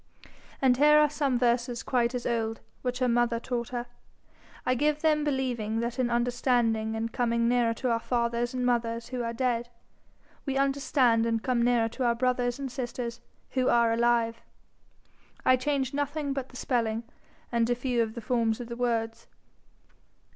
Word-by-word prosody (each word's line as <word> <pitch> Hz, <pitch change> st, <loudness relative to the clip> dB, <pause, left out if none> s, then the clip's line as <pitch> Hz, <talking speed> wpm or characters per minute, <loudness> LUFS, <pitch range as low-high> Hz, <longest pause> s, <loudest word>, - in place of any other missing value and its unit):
And 250 Hz, -2 st, +4 dB
here 300 Hz, +2 st, +6 dB
are 300 Hz, -1 st, +4 dB
some 280 Hz, -4 st, 0 dB
verses 240 Hz, 0 st, 0 dB
quite 245 Hz, -1 st, +1 dB
as 245 Hz, -, -4 dB
old, 225 Hz, -1 st, -1 dB, 0.2 s
which 250 Hz, -1 st, -2 dB
her 255 Hz, 0 st, +1 dB
mother 235 Hz, -1 st, +2 dB
taught 240 Hz, -1 st, -3 dB
her. 245 Hz, -1 st, -3 dB, 0.8 s
I 255 Hz, -, +3 dB
give 300 Hz, +4 st, +1 dB
them 305 Hz, -1 st, +3 dB
believing 250 Hz, -6 st, -1 dB
that 235 Hz, +2 st, -3 dB
in 250 Hz, -2 st, +1 dB
understanding 235 Hz, -2 st, +1 dB
and 225 Hz, +1 st, -3 dB
coming 235 Hz, -2 st, +1 dB
nearer 235 Hz, -1 st, +2 dB
to 250 Hz, +1 st, -1 dB
our 230 Hz, -, +1 dB
fathers 235 Hz, 0 st, -1 dB
and 250 Hz, -1 st, -1 dB
mothers 230 Hz, -1 st, 0 dB
who 250 Hz, -1 st, -3 dB
are 230 Hz, -1 st, -2 dB
dead, 240 Hz, 0 st, -1 dB, 0.7 s
we 270 Hz, -2 st, -2 dB
understand 270 Hz, -4 st, +2 dB
and 225 Hz, -1 st, -1 dB
come 250 Hz, -2 st, +1 dB
nearer 235 Hz, -1 st, +3 dB
to 255 Hz, +3 st, -4 dB
our 235 Hz, -1 st, +2 dB
brothers 245 Hz, 0 st, 0 dB
and 275 Hz, -2 st, -5 dB
sisters 240 Hz, -1 st, -5 dB, 0.3 s
who 255 Hz, -1 st, +1 dB
are 235 Hz, -1 st, +4 dB
alive. 230 Hz, 0 st, +1 dB, 1.0 s
I 255 Hz, -, +6 dB
change 265 Hz, 0 st, -1 dB
nothing 290 Hz, 0 st, -2 dB
but 270 Hz, -1 st, -4 dB
the -, -, -16 dB
spelling, 230 Hz, -3 st, -1 dB, 0.5 s
and 235 Hz, -1 st, +1 dB
a 245 Hz, -, +2 dB
few 245 Hz, -1 st, 0 dB
of 220 Hz, -1 st, -2 dB
the 235 Hz, -, -5 dB
forms 230 Hz, -1 st, 0 dB
of 240 Hz, -1 st, -7 dB
the 235 Hz, -, -5 dB
words. 230 Hz, -2 st, -2 dB
240 Hz, 175 wpm, -28 LUFS, 235-255 Hz, 1.0 s, here